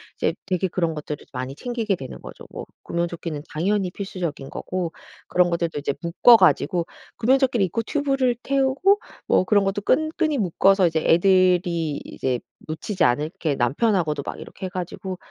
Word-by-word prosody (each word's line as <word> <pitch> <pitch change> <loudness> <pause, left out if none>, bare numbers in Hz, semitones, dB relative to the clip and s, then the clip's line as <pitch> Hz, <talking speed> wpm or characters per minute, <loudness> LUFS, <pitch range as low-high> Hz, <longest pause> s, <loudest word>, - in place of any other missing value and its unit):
이제 - - 0
되게 185 0 0
그런 170 -2 -1
것들을 150 -1 -6
많이 130 +2 -4
챙기게 230 -3 -2
되는 130 -6 -9
거죠. - - -11
뭐 - - -7 0.2
구명조끼는 170 -3 -3
당연히 190 +4 0
필수적인 175 -8 -5
거고 180 -3 -3 0.4
그런 180 -1 +3
것들도 170 -3 -1
이제 140 -1 -1
묶어가지고 180 -1 +5 0.3
구명조끼를 255 -3 +3
입고 205 +6 -2
튜브를 270 -2 0
태우고 275 +10 +2 0.3
뭐 - - +4
그런 205 +1 +3
것도 195 +1 -1
끈 310 +9 +2
끈이 310 -4 +1
묶어서 195 -1 +3
이제 160 -1 +1
애들이 175 -3 +3
이제 125 -2 -2 0.3
놓치지 170 +4 -2
않게 150 +4 0
남편하고도 150 - +1
막 - - -6
이렇게 190 - -7
해 - - -7
가지고 185 +1 -5
180 Hz, 370 characters per minute, -23 LUFS, 160-215 Hz, 0.4 s, 묶어가지고